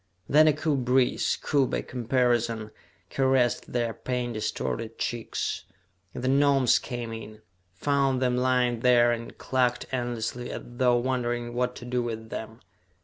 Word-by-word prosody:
Then 155 +2 +6
a 155 - +5
cool 150 0 0
breeze, 125 0 +2
cool 140 -3 +2
by - - -2
comparison, 120 -3 0 0.4
caressed 130 -3 +1
their 120 -2 0
pain 125 -1 -3
distorted 110 +1 -3
cheeks, 120 -2 -3 0.5
and - - -5
the - - 0
Gnomes 135 -2 +4
came 120 -2 -5
in, 110 -1 -9 0.3
found 135 +4 +1
them 125 -1 +1
lying 125 -1 +2
there, 120 0 +5
and 115 0 -5
clucked 125 -1 0
endlessly 120 -1 -3
as - - -6
though 120 0 +2
wondering 120 -1 -1
what 125 0 -1
to 120 - -9
do 125 0 -1
with 110 -1 -5
them. 110 +1 -7
125 Hz, 145 wpm, -27 LUFS, 120-130 Hz, 0.5 s, Then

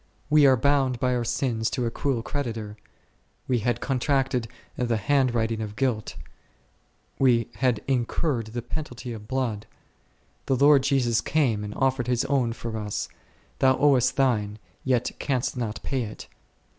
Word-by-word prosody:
We 150 -2 +7
were 130 -1 +5
bound 135 -1 +2
by 125 +1 +1
our 120 -1 0
sins 120 -2 -1
to 125 - -2
a 115 - -1
cruel 130 -4 -1
creditor, 115 -8 -4 0.7
we 125 -2 +2
had 120 +1 -1
contracted 130 -2 0 0.3
the 120 -2 0
hand 130 +2 +2
writing 110 -1 0
of 105 -1 -5
guilt, 120 -4 -1 1.0
we 120 -4 +3
had 125 -5 +1
incurred 125 -1 0
the 120 +2 -5
penalty 125 -2 -6
of 105 -1 -9
blood; 120 -5 -2 0.8
the 135 - +2
Lord 140 +1 +6
Jesus 130 -4 +2
came 125 -9 +1
and 105 0 -6
offered 130 -2 +1
His 125 0 +1
own 130 -5 +1
for 115 -1 -5
us; 105 -1 -3 0.5
thou 130 -1 +4
owest 135 -4 +3
thine, 110 -6 +1 0.3
yet 125 -2 +1
canst 130 -3 -1
not 110 -4 -4
pay 135 -2 -1
it. 110 -2 -7
125 Hz, 155 wpm, -25 LUFS, 115-135 Hz, 1.0 s, We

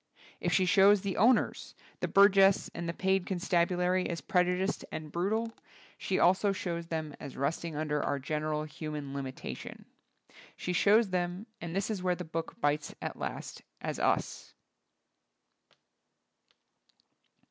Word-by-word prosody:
If - - -1
she 190 - +3
show& 195 +2 +6
the 195 -1 -3
owners, 240 +4 +2 0.2
the - - -1
burgess 195 -1 +5
and 170 0 -4
the - - -2
paid 190 0 +1
con 190 - -1
stabulary, 180 +1 +1
as 170 - -3
prejudiced 180 +5 0
and 155 -1 -6
brutal, 215 +7 -1 0.4
she 190 - -2
also 190 +3 +4
shows 170 -3 -4
them 160 -3 -4
as 140 - -8
resting 155 +3 -2
under 150 -1 -1
our 145 - -1
general 150 +2 -2
human 150 -2 -6
limitation. 135 -2 -6 0.7
She 180 - -3
shows 205 +3 +4
them, 180 +2 -2 0.2
and 170 0 -5
this 195 +3 -1
is 200 -4 -3
where 180 -1 +1
the 180 - -6
book 165 +1 -5
bites 145 0 0
at - - -4
last, - - -5 0.2
as - - -4 0.2
tis. - - -9
175 Hz, 140 wpm, -31 LUFS, 155-190 Hz, 0.7 s, show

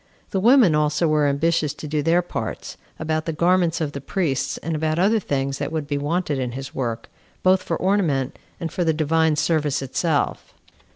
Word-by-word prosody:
The 190 - 0
women 230 - +6
also 150 +2 +2
were 150 -1 +3
ambitious 150 +1 +1
to 150 - -8
do 150 0 0
their 170 +4 +2
parts, 175 - -5 0.2
about 155 0 -2
the - - 0
garments 170 +1 +2
of 155 -3 -2
the 140 - -6
priests, 145 -2 -1
and 165 -1 -3
about 155 +1 0
other 205 +5 +3
things 140 -6 -2
that 145 +1 -3
would 160 -2 -2
be 145 0 -2
wanted 150 -1 -1
in 125 -1 -1
this 135 +3 -7
work, 115 -3 -3 0.4
both 185 0 +4
for - - -2
ornament 165 -9 0 0.2
and 165 -2 -4
for 175 - -1
the 160 -1 +2
divine 160 0 +2
service 150 -2 +1
itself. 145 +3 -1
155 Hz, 190 wpm, -22 LUFS, 145-170 Hz, 0.4 s, women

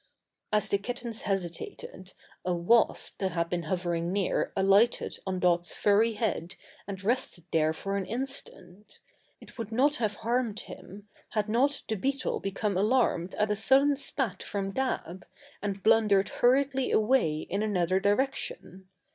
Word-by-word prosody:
As 210 0 +2
the 200 - +1
kittens 235 +1 -4
hesitated, 185 0 -4 0.3
a 180 -1 0
wasp 200 +7 +2
that 190 -3 -1
had 170 -1 -1
been 175 -2 -2
hovering 175 -2 -1
near 195 -1 0
alighted 195 +5 +3
on 185 -1 -1
Dot's 175 -1 +1
furry 215 +3 +3
head 210 -5 -2 0.3
and 195 -1 -6
rested 210 -5 0
there 155 -1 +3
for 195 +5 -4
an 190 -2 -3
instant. 235 -5 -6 0.4
It - - -16
would 225 -1 -5
not 280 +6 +2
have 215 -3 -1
harmed 230 0 -1
him, 200 +3 -11 0.3
had 215 -2 0
not 265 +6 +1
the - - -1
beetle 270 +6 -1
become 195 0 -2
alarmed 205 -4 +1
at 210 0 +1
a - - +2
sudden 270 +6 +4
spat 260 -7 -1
from 195 -1 -3
Dab, 190 -7 -3 0.4
and 200 -2 -4
blundered 215 -3 +4
hurriedly 265 +1 +2
away 215 -10 +2
in 195 +5 -3
another 185 -3 +1
direction. 200 -3 -2
205 Hz, 145 wpm, -28 LUFS, 185-235 Hz, 0.4 s, sudden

